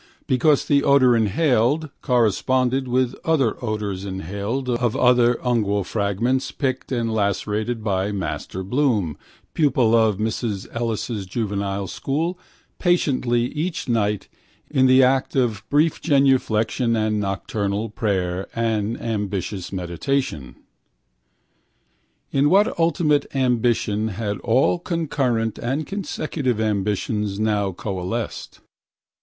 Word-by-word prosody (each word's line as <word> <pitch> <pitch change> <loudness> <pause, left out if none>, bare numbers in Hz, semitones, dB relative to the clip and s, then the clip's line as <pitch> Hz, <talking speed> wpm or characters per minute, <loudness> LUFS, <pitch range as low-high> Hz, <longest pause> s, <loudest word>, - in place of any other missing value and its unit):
Because 140 +3 +3
the 140 -1 +3
odour 130 -3 +5
inhaled 125 - +2
corresponded 125 +2 +1
to 125 0 +1
other 140 -9 +2
odours 105 -4 -3
inhaled 100 +7 -4
of 120 -2 0
other 125 -1 +4
ungual 105 -6 +1
fragments, 115 +7 -1
picked 130 -2 -3
and 115 -3 -1
lacerated 105 +2 -1
by 100 -1 0
Master 95 -1 -4
Bloom, 105 - 0 0.4
pupil 130 -7 +3
of 110 -3 +3
Mrs 110 -2 -2
Ellis's 115 -3 -2
juvenile 100 -2 -2
school, 160 - -2 0.4
patiently 135 -9 +2
each 160 +1 -3
night 105 -4 0 0.4
in 130 -3 +4
the 130 +1 +6
act 130 +2 +2
of 120 -7 +1
brief 150 +2 +2
genuflection 130 -5 +2
and 110 -1 0
nocturnal 100 +1 -2
prayer 95 -4 -1
and 115 -1 -1
ambitious 100 -4 -3
meditation. 95 - -2 1.8
In 140 +1 +3
what 205 +3 +3
ultimate 165 -3 +2
ambition 120 -4 +1
had 105 -1 -3
all 130 +9 +2
concurrent 135 - -1
and 135 +6 -2
consecutive 155 - -2
ambitions 105 -1 -1
now 105 -2 +1
coalesced? 95 +4 -5
115 Hz, 105 wpm, -22 LUFS, 105-130 Hz, 1.8 s, the